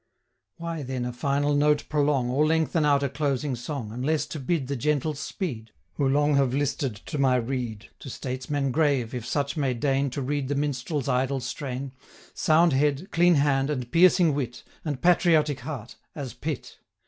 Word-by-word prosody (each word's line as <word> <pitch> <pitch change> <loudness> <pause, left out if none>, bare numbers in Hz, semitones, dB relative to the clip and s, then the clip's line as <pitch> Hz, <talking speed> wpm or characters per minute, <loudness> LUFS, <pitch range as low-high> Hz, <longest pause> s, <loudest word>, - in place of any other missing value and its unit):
Why 165 -2 -4
then 130 -2 -3
a 125 - -4
final 140 +3 0
note 145 +1 +2
prolong, 145 -4 +1
Or 140 +4 +2
lengthen 160 0 +2
out 140 -1 +3
a - - +2
closing 140 -1 -1
song, 120 -2 -5
Unless 135 +7 0
to 155 - -5
bid 140 +1 -1
the 140 +2 -3
gentles 150 +2 0
speed, 120 - -4 0.2
Who 135 +4 +1
long 145 +2 +3
have 135 -2 +2
listed 140 -4 -1
to 140 +8 -6
my 130 -2 +4
rede? 120 -3 -3
To 135 - -8
Statesmen 130 +2 -3
grave, 140 -5 +1
if 120 -2 -5
such 140 +3 -1
may 135 -5 0
deign 135 +3 +1
5 135 - -4
To 140 - -3
read 140 0 -1
the 145 - -1
Minstrel's 145 0 -2
idle 130 +2 +1
strain, 130 +1 -5 0.4
Sound 160 0 +3
head, 145 +6 +1
clean 175 +1 +4
hand, 140 -1 +2
and 125 -5 -3
piercing 170 -2 +5
wit, 125 -4 -4 0.2
And 145 -5 -3
patriotic 160 -5 +4
heart 125 -3 -7 0.2
as 140 -4 -5
PITT! 155 -3 -5
140 Hz, 180 wpm, -26 LUFS, 130-150 Hz, 0.4 s, piercing